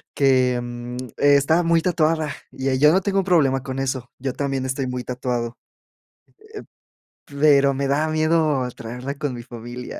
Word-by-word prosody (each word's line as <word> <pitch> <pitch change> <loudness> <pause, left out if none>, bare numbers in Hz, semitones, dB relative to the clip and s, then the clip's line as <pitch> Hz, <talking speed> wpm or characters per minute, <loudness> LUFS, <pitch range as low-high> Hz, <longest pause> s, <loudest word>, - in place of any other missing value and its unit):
Que, 130 -3 +3
mm, 120 0 -7 0.2
estaba 145 +4 +4
muy 165 -1 +3
tatuada 160 -3 +1 0.2
y 130 0 -1
yo 150 +1 +6
no 190 - +3
tengo 195 -1 0
problema 140 -8 +3
con 130 0 -5
eso, 130 -2 -3
yo 130 0 -2
también 135 -1 -2
estoy 130 0 -2
muy 125 -1 -4
tatuado, 120 -1 -3 1.7
eh, - - -11
pero 140 -2 +5
me 140 +1 -2
da 150 +3 +1
miedo 155 -4 +1
traerla 125 +5 -6
con 145 -2 -3
mi 120 -1 -7
familia, 120 +1 -8
135 Hz, 155 wpm, -22 LUFS, 125-155 Hz, 1.7 s, yo